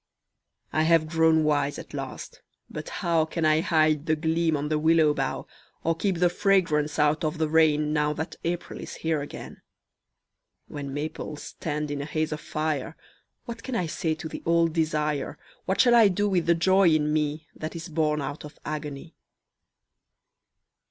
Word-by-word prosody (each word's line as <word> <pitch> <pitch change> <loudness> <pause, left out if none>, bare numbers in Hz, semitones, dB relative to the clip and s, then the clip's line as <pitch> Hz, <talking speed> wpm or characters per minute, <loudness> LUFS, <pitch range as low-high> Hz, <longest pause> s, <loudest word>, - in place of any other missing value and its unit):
I 155 - +2
have 160 0 +3
grown 160 0 +3
wise 145 -1 +1
at - - -10
last - - -7 0.3
but - - -6
how 165 -2 +1
Can 160 +1 -2
I 155 0 +4
hide 155 -2 +2
the 155 - +3
gleam 160 0 +1
on 145 +1 -3
the 155 -1 +1
willow 160 -1 +4
bough, - - -2 0.4
Or 165 0 +1
keep 190 +1 -1
the 175 +1 +4
fragrance 170 -6 +1
out 150 +1 +2
of 155 +1 -1
the 160 0 +1
rain 150 -1 +3
Now 150 -1 +1
that 160 +2 -5
April 175 +1 -3
is - - -7
here 160 -2 -1
again? 145 - -9 1.1
When 140 -2 -6
maples 150 +1 -5
stand 150 -1 -4
in 145 -1 -3
a - - -4
haze 155 +1 -2
of 150 - -4
fire 155 -2 -3 0.5
What 235 -2 -7
can 260 - -5
I 180 - 0
say 160 0 -2
to 160 - -7
the - - -7
old 170 -1 +2
desire, 150 -3 -1 0.3
What 190 - -1
shall 240 -2 +5
I 230 -3 +7
do 205 +2 +1
with 180 -4 0
the 170 - +5
joy 185 +2 +4
in 150 -1 +2
me 155 0 -1
That 155 +2 -6
is 170 +1 -6
born 150 -2 0
out 145 +2 -5
of 150 0 -11
agony? 150 +1 -5
155 Hz, 180 wpm, -26 LUFS, 150-165 Hz, 1.1 s, I